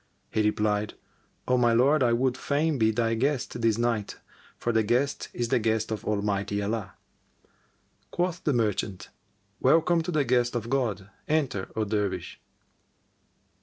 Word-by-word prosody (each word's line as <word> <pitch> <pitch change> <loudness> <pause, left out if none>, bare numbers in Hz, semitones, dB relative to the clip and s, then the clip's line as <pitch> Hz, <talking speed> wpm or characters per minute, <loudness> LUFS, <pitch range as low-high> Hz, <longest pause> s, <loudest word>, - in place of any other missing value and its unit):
He 110 - +1
replied, 105 0 0 0.5
"O 125 - +3
my 120 -1 +4
lord, 135 +6 +4
I 120 -2 +3
would 125 +2 +1
fain 145 +2 0
be 110 0 +4
thy 115 +1 +1
guest 130 0 -1
this 115 -1 +2
night, 115 -3 -1 0.4
for 120 - -1
the 110 - +4
guest 125 +6 0
is 120 -1 -3
the 130 - +3
guest 110 0 0
of 110 -3 -3
Almighty 100 -1 -1
Allah." 105 0 -3 1.1
Quoth 175 -1 -2
the 150 - +2
merchant, 105 -6 -1 0.5
"Welcome 165 +1 +4
to 160 - -5
the 155 -4 +2
guest 120 -1 +1
of 120 0 -3
God: 105 -8 -1 0.2
enter, 140 -11 0
O 110 - 0
Dervish!" 105 -2 -2
115 Hz, 150 wpm, -27 LUFS, 105-135 Hz, 1.1 s, my